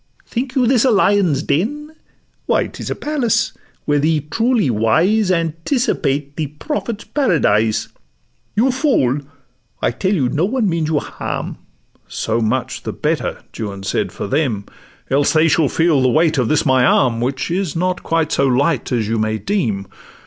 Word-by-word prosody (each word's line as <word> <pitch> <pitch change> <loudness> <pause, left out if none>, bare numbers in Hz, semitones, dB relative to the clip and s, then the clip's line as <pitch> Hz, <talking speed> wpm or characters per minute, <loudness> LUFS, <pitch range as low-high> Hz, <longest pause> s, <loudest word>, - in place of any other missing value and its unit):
think 250 +2 -4
you 255 -2 +3
this 240 -1 +3
a 265 - +4
lion's 195 - +3
den? 290 - -1 0.5
Why, - - +2
'tis - - -7
a - - -2
palace; 285 -7 0 0.3
where 145 0 +2
the 155 +1 +1
truly 230 - +2
wise 165 - +2
Anticipate 165 - -1
the 155 -2 -1
Prophet's 215 - -4
paradise. 115 - +1 0.7
'You 250 +5 +3
fool! 250 - +1 0.6
I - - +1
tell 190 - 0
you 135 -8 +1
no 150 +7 0
one 230 +1 0
means 165 -3 0
you 160 - +1
harm.' - - -4 0.5
'So 115 +1 -2
much 110 -1 -1
the - - -5
better,' - - -2 0.2
Juan 100 -3 -5
said, 95 - -1
'for - - -5
them; 130 -8 -1 0.5
Else 140 +2 +3
they 160 +1 +4
shall 155 -2 +3
feel 160 -4 +2
the 130 - +3
weight 155 +1 +2
of 125 - +1
this 155 - +1
my 130 -2 +4
arm, 125 -2 +3
Which 130 +4 -2
is 180 -3 -1
not 180 +2 -1
quite 165 -2 0
so 140 - +2
light 135 +2 +1
as 115 -4 0
you 115 +1 0
may 110 0 0
deem. 110 - -1
155 Hz, 165 wpm, -18 LUFS, 130-205 Hz, 0.7 s, a